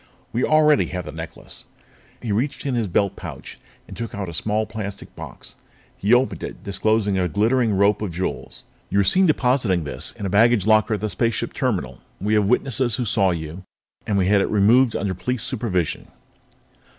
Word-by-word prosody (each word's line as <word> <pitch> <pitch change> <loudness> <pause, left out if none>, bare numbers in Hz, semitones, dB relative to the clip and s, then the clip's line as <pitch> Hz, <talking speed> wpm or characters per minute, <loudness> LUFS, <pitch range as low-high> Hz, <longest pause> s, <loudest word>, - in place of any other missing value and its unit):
We 120 - 0
already 155 -1 +4
have 90 -1 -5
the - - -6
necklace." - - -9 0.6
He 115 - -2
reached 125 +9 -1
in 135 - -1
his 115 -3 0
belt 100 +2 0
pouch - - -9 0.3
and - - -10
took 115 -3 -6
out 100 -3 -4
a - - -7
small 105 +6 0
plastic 110 -2 -7
box. - - -9 0.4
He 100 - -1
opened 125 +2 +3
it, - - -7
disclosing 100 0 +1
a 90 - +1
glittering 110 +5 +1
rope 100 +2 +3
of 105 -4 -3
jewels. 90 +3 -5 0.3
"You - - -1
were 100 - +5
seen 185 - +5
depositing 125 - +2
this 75 - 0
in 100 - -7
a - - 0
baggage 110 0 +4
locker 110 0 +3
at 100 - -6
the 110 - -1
spaceship 115 +3 -1
terminal. 65 -1 -2 0.2
We 105 +3 -1
have 105 -2 +2
witnesses 125 -2 +1
who 125 - -2
saw 100 -2 +2
you, 80 +1 -4 0.5
and 100 - +1
we 95 - +2
had 100 +1 +4
it - - -1
removed 110 +4 +4
under 100 -2 -1
police 125 +6 -3
supervision." 105 - -2
105 Hz, 190 wpm, -22 LUFS, 95-120 Hz, 0.6 s, were